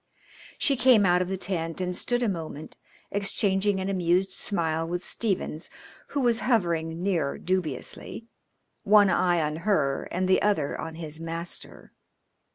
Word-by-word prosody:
She 280 - +2
came 245 -5 +5
out 180 0 +4
of 180 - -1
the 190 +1 -2
tent 165 -3 -1
and 180 -1 -2
stood 245 +6 0
a - - +2
moment 160 -5 -5 0.4
exchanging 200 0 +1
an 190 - -2
amused 185 0 +1
smile 165 -5 0
with 175 +1 -3
Stephens, 190 -7 -2 0.4
who 285 - -2
was 240 -2 +3
hovering 170 -8 0
near 170 -8 0
dubiously, 185 - -3 0.6
one 205 -1 +5
eye 175 -3 +2
on 150 +1 -2
her 160 -7 0
and 185 +1 -1
the 185 - +3
other 195 -9 +1
on 160 - -6
his 160 -1 -5
master. 165 +1 -6
180 Hz, 150 wpm, -26 LUFS, 165-200 Hz, 0.6 s, came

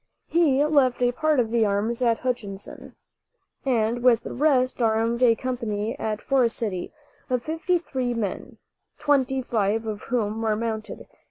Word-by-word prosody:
He 295 -4 +3
left 280 -5 +3
a 245 - +3
part 310 +2 +1
of 225 -2 0
the 230 -1 +3
arms 215 +4 0
at 230 -2 +3
Hutchinson, 215 -6 -5 0.7
and 235 -2 +1
with 240 -2 +4
the - - -6
rest 260 -3 +2
armed 225 +1 +1
a 235 -2 +5
company 230 -3 -3
at 215 -1 -3
Forest 255 -4 +2
City, 195 -6 -3 0.4
of 250 -2 0
fifty 330 +3 0
three 260 -7 -3
men, 210 -5 -4 0.4
twenty 265 -2 +1
five 220 -1 0
of 215 -1 -4
whom 225 -2 -1
were 220 -1 +1
mounted. 220 -1 -4
235 Hz, 155 wpm, -25 LUFS, 220-260 Hz, 0.7 s, a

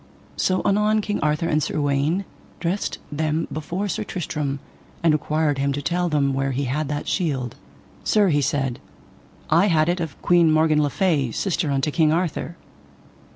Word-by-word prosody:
So 185 0 +1
anon 210 +2 +3
King 205 0 -2
Arthur 150 +2 0
and 155 -2 +2
Sir 150 - -2
Uwaine 145 +6 +1 0.3
dressed 180 +4 -2
them 155 +2 -1
before 175 +6 -3
Sir 195 - -2
Tristram, 150 -5 -3 0.5
and 165 -2 +5
required 150 -1 0
him 140 0 +1
to 145 - -3
tell 175 +3 0
them 140 -3 +1
where 135 0 -1
he 140 +3 -1
had 140 +4 -1
that 145 +1 -3
shield. 135 - -1 0.5
Sir, 205 -3 +3
he 145 -3 +2
said, 135 -2 -1 0.7
I 170 +6 +5
had 160 -3 +3
it 175 +1 0
of 160 -5 -5
Queen 170 -2 +5
Morgan 155 -1 +3
le 145 - +1
Fay, 150 -6 +1
sister 175 - -1
unto 140 +2 0
King 155 -1 +3
Arthur. 170 0 -1
155 Hz, 170 wpm, -23 LUFS, 145-175 Hz, 0.7 s, and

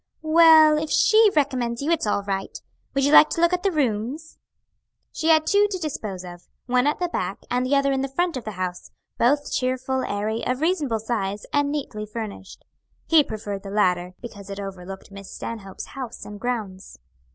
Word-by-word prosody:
"Well, 315 -1 +7
if 310 0 -4
she 435 +5 +5
recommends 255 -5 0
you, 310 - 0
it's 330 -9 +1
all 200 -1 0
right. 195 -1 -4 0.4
Would 275 0 +2
you 285 - +2
like 305 - +8
to - - -3
look 340 +1 +3
at 360 - 0
the 395 - +2
rooms?" 275 - -2 0.7
She 320 - -3
had 315 -1 +5
two 405 +4 +4
to 385 - -3
dispose 225 - -5
of 175 0 -11 0.2
one 250 +2 +2
at 295 - +1
the 355 - -1
back 345 - -4
and 250 0 +1
the 260 +3 +1
other 275 0 +2
in 265 -1 0
the 270 - -1
front 345 +4 -1
of 255 - -5
the 215 - -6
house, 180 -1 -5 0.3
both 285 +5 +2
cheerful, 260 +1 -1
airy, 215 +2 -2
of 255 0 -1
reasonable 305 -8 0
size, 210 -3 -3
and 290 0 +2
neatly 230 -8 -4
furnished. 210 -3 -8 0.4
He 320 -2 +5
preferred 205 -4 -6
the 200 - -8
latter, 180 -3 0
because 205 -4 -10
it 200 0 -6
overlooked 190 -1 -8
Miss 200 -1 -10
Stanhope's 200 -4 -7
house 255 -4 -7
and 205 0 -9
grounds. 205 - -5
250 Hz, 195 wpm, -23 LUFS, 205-300 Hz, 0.7 s, like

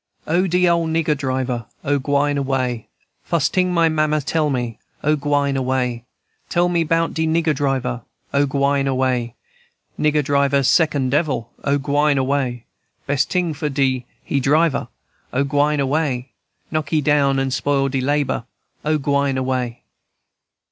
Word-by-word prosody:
"O, 175 +4 +1
de 180 +1 +3
ole 170 -1 +2
nigger 160 -1 +1
driver! 130 -4 -2 0.2
O, 145 0 +1
gwine 145 +1 +1
away! 130 -4 -1 0.3
Fust 165 -5 0
ting 180 -1 +2
my 170 -2 +3
mammy 155 -1 +1
tell 155 +2 0
me, 120 -4 -3 0.2
O, 150 +1 +3
gwine 145 -1 0
away! 125 -2 -1 0.4
Tell 175 0 +2
me 170 -1 +2
'bout 165 +1 +1
de 160 0 0
nigger 160 -1 +2
driver, 135 -3 -1 0.3
O, 140 0 +3
gwine 140 0 +1
away! 130 -3 0 0.6
Nigger 150 0 +2
driver 140 0 +2
second 145 -3 +2
devil, 140 -6 0
O, 140 0 +2
gwine 145 +1 +1
away! 130 -3 -1 0.4
Best 140 -1 0
ting 180 -3 0
for 150 +1 -3
do 135 -2 +1 0.2
he 140 - -1
driver, 140 +1 +2 0.5
O, 135 +2 +2
gwine 145 +2 +1
away! 135 -2 -1 0.4
Knock 155 -1 -2
he 160 - +2
down 145 -2 +2
and 135 -1 0
spoil 135 +1 +1
he 135 -1 -1
labor, 140 -3 0 0.4
O, 155 +1 +1
gwine 140 -1 0
away!" 130 -2 -2
140 Hz, 150 wpm, -20 LUFS, 130-155 Hz, 0.6 s, de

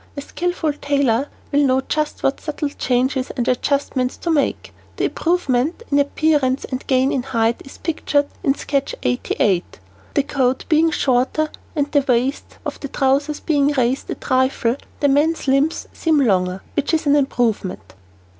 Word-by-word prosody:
A - - -2
skilful 340 0 -2
tailor 280 -3 +1 0.2
will 285 - +3
know 260 -1 +3
just 305 +2 -2
what 270 - +1
subtle 295 -1 -3
changes 260 -1 0
and 240 -1 -1
adjustments 255 0 0
to 340 - -2
make. 295 -3 0 0.2
The - - -2
improvement 320 - 0
in 285 - +4
appearance 285 -2 +1
and 255 0 -5
gain 260 0 +3
in 265 - 0
height 230 -2 0
is 270 - -13
pictured 295 -3 0 0.2
in 275 - +2
sketch 280 -2 -2
88. 175 - 0 0.4
The 285 - +3
coat 265 -3 0
being 320 +1 +4
shorter 280 +1 +1 0.2
and 290 -2 0
the 285 - +4
waist 255 +3 0
of - - -4
the 280 - -5
trousers 280 +2 +1
being 290 -2 +2
raised 255 -1 0
a - - -2
trifle, 260 -1 +1 0.2
the 285 - +4
man's 295 +3 +2
limbs 275 +4 +1
seem 320 -3 +2
longer, 185 -6 +1
which 290 +3 +1
is 315 - -1
an 285 0 +4
improvement. 240 -8 -1
275 Hz, 160 wpm, -20 LUFS, 255-295 Hz, 0.4 s, in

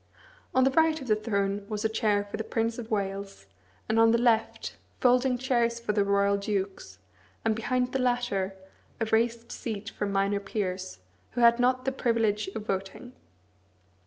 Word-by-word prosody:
On 260 - +5
the 265 - +4
right 320 +2 +3
of 265 - -8
the 215 - +4
throne 200 -2 -1
was 210 0 -3
a - - +6
chair 215 -2 +1
for 205 - -7
the 220 - -3
Prince 225 +2 -1
of 230 -1 -7
Wales, 195 - -3 0.4
and 220 +1 +2
on 225 0 +6
the 230 - +4
left, 230 -2 +1 0.2
folding 250 0 +3
chairs 235 -2 +1
for 230 -2 -2
the 205 -1 +3
royal 200 0 +2
dukes, 195 - -3 0.5
and 220 -1 +2
behind 250 +3 0
the 265 - -1
latter, 245 -7 0 0.4
a 225 - +1
raised 230 +1 0
seat 215 -3 -5
for 205 - -3
minor 200 0 +1
peers, 185 - -4 0.3
who 245 - -1
had 235 0 +6
not 255 +1 +2
the 265 - +1
privilege 225 -5 0
of 215 -1 -5
voting. 195 +6 -4
220 Hz, 175 wpm, -28 LUFS, 200-245 Hz, 0.5 s, a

